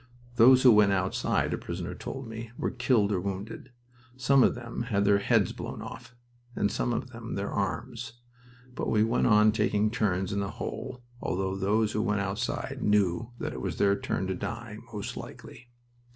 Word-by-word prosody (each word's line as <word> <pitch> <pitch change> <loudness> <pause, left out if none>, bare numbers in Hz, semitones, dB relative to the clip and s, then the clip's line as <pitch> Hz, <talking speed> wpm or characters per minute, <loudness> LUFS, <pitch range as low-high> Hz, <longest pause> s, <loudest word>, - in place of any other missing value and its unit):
"Those 130 +2 +7
who 125 - +9
went 105 -2 +6
outside," 95 -1 0
a - - -2
prisoner - - -5
told 135 -2 -6
me, 110 0 -7
"were - - -1
killed 120 -4 +2
or 95 -3 0
wounded. 100 +6 -5 0.5
Some 135 +2 +4
of - - +4
them 120 -1 -5
had 100 -2 +2
their 100 0 +5
heads - - +2
blown - - -6
off, 120 +1 -10 0.4
and 100 - +1
some 120 - -1
of 125 +2 -3
them 115 -1 -6
their 100 0 -3
arms. 115 +5 -3 0.6
But - - -3
we 105 -1 +3
went 115 +2 +2
on 105 -1 +6
taking 105 0 +1
turns 100 -4 0
in 100 - 0
the 100 -1 -2
hole, 125 -1 -5 0.2
although 95 +1 -1
those 105 +3 +1
who 110 - 0
went 105 -2 0
outside 120 +6 -3
knew 105 +1 +2
that - - -4
it - - -6
was - - -3
their 100 0 +3
turn 95 - -2
to 95 - -1
die, 115 +2 -6
most 105 -2 -5
likely. 120 0 -10
110 Hz, 185 wpm, -28 LUFS, 100-120 Hz, 0.6 s, who